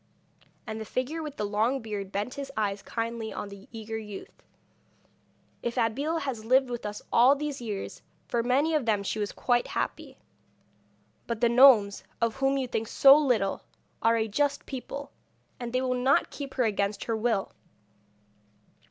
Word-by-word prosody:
And 220 0 -5
the - - -2
figure 255 +8 -3
with 300 -2 -7
the 210 - -1
long 220 +6 +1
beard 205 -4 -5
bent 205 +6 -2
his 280 -1 -6
eyes 200 -2 -1
kindly 230 -1 -4
on 205 - -5
the 200 -1 -12
eager 220 -1 -5
youth. 210 -2 -10 1.2
'If 235 +1 -3
Abeille 270 +8 0
has 255 -6 -4
lived 255 +2 +3
with 235 -3 -4
us 210 0 -7
all 250 +4 +6
these 290 -2 -4
years, 210 -4 -5 0.3
for 235 - 0
many 270 +7 +2
of 295 -6 0
them 210 -2 +2
she 215 - -2
was 205 -1 -2
quite 240 -1 +1
happy. - - -3 1.1
But 235 -2 -2
the 235 0 +4
gnomes, 235 -5 +6 0.2
of 230 0 0
whom 270 0 +2
you 265 -2 -1
think 225 -2 -2
so 275 +4 +7
little, 250 -10 +1 0.4
are 230 0 +4
a 220 0 0
just 285 +6 0
people, 275 +1 -6 0.5
and 240 -1 -5
they 255 +1 +1
will 255 -1 0
not 255 +2 +2
keep 280 -2 -7
her 255 - +2
against 205 -2 0
her 225 - -1
will. 220 -3 0
235 Hz, 170 wpm, -28 LUFS, 215-270 Hz, 1.2 s, so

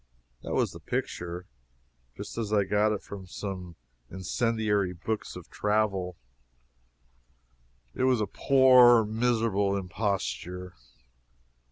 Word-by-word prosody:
That - - -4
was - - +1
the - - -10
picture, 85 +1 -4 0.7
just - - -7
as 110 -3 -3
I 105 -2 +3
got 105 +2 +2
it 105 - -3
from 95 -2 -9 0.8
incendiary 105 0 0
books 105 +5 -4
of - - -10
travel. 100 -4 0 1.8
It 130 - 0
was 130 -3 +3
a 105 - +1
poor, 125 0 +6
miserable 110 -3 +1
imposture. 90 - -3
105 Hz, 100 wpm, -28 LUFS, 95-115 Hz, 1.8 s, poor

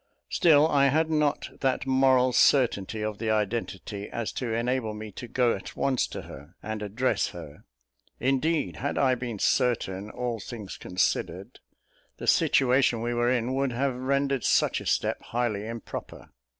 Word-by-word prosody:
Still 155 -2 +5
I 140 -3 +4
had 160 +3 +1
not 150 -1 0
that 130 -1 0
moral 130 -1 +3
certainty 110 -6 +3
of 105 -1 -3
the 110 0 -2
identity, 105 -2 -2
as 115 -2 -3
to 125 -3 -4
enable 115 -1 -1
me 105 0 -7
to 120 +6 -8
go 120 0 +2
at 95 - -7
once 135 -3 +1
to - - -7
her, 75 +6 -12
and 110 0 -4
address 110 +6 0
her. - - -10 0.5
Indeed, 135 +5 0
had 140 - -3
I 130 -1 +3
been 120 -3 -4
certain, 105 -4 0
all 120 -1 -3
things 105 -4 -7
considered, 90 0 -2 0.6
the - - -7
situation 125 -3 +3
we 120 +1 -1
were 120 0 +1
in 125 0 0
would 135 -1 0
have 135 +2 0
rendered 135 0 0
such - - +2
a - - -7
step - - 0
highly 115 -3 -2
improper. 115 -1 -8
125 Hz, 160 wpm, -27 LUFS, 110-135 Hz, 0.6 s, Still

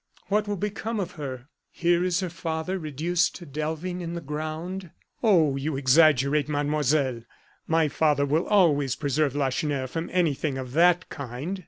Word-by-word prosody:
What 210 +1 +1
will 205 -1 -2
become 210 +3 -3
of 185 -3 -3
her? 130 -4 -7 0.2
Here 175 0 +1
is 180 0 +1
her 185 - -2
father, 165 +2 -3
reduced 165 +3 0
to 175 - -9
delving 160 +5 -4
in 170 0 -5
the - - -3
ground." 155 +5 -5 0.3
"Oh! 170 - +4
you 140 +1 -2
exaggerate, 145 +1 +4
Mademoiselle; 145 -3 +1 0.5
my 160 -1 +3
father 145 -1 +2
will 155 +4 0
always 145 - +3
preserve 145 -1 0
Lacheneur 140 0 0
from 165 +6 -4
anything 155 -5 0
of 130 -2 -6
that 175 +4 +4
kind." 140 +7 -5
155 Hz, 155 wpm, -26 LUFS, 140-175 Hz, 0.5 s, Oh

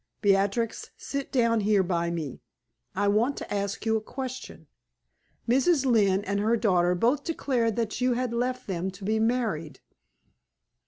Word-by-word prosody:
"Beatrix, 200 +3 +1
sit 280 -1 -5
down 230 -3 +2
here 205 -2 +3
by 170 -2 -1
me; 160 -6 -5 0.5
I 205 - +1
want 225 +7 +2
to - - -6
ask 200 +1 -3
you 225 0 +2
a - - -4
question. 260 +3 -7 0.8
Mrs. 270 +4 +3
Lynne 205 -6 +3
and 200 0 -1
her 225 +3 +2
daughter 180 -5 +2
both 250 +10 +1
declared 250 -9 0
that 230 +1 -2
you 250 0 +3
had 245 -1 -2
left 250 +2 -2
them 185 -1 -2
to 190 +1 -11
be 220 +2 +1
married." 220 - -1
220 Hz, 155 wpm, -27 LUFS, 195-245 Hz, 0.8 s, here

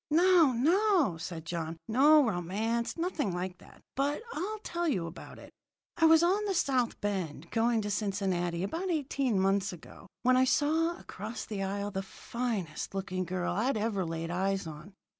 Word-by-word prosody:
"No, 340 -2 +5
no," 330 - +3
said 165 0 -6
John. 165 -1 -4
"No 285 +6 +6
romance 220 - -1
nothing 330 - -1
like 180 +1 -4
that! - - -18
But 285 +8 0
I'll 410 +7 -3
tell 345 0 -2
you 190 - 0
about 165 +1 -9
it. - - -13 0.4
"I 325 - +3
was 320 +1 +7
on 385 +5 +2
the 395 -2 -1
south 255 -7 +1
bound, 175 -6 -3
going 230 -1 +2
to 205 - -2
Cincinnati, 190 -4 -1
about 335 - -3
eighteen 275 - 0
months 195 +1 +2
ago, 180 - -12 0.2
when 255 +1 +5
I 260 - +5
saw, 320 +5 +2
across 215 - -7
the 205 -3 -4
aisle, 200 +1 -2
the 195 -1 -2
finest 195 -4 -4
looking 185 -1 -2
girl 180 0 -2
I'd 225 +6 +1
ever 210 -3 0
laid 165 0 -4
eyes 195 +2 0
on. 160 +5 -10
215 Hz, 170 wpm, -30 LUFS, 185-290 Hz, 0.4 s, was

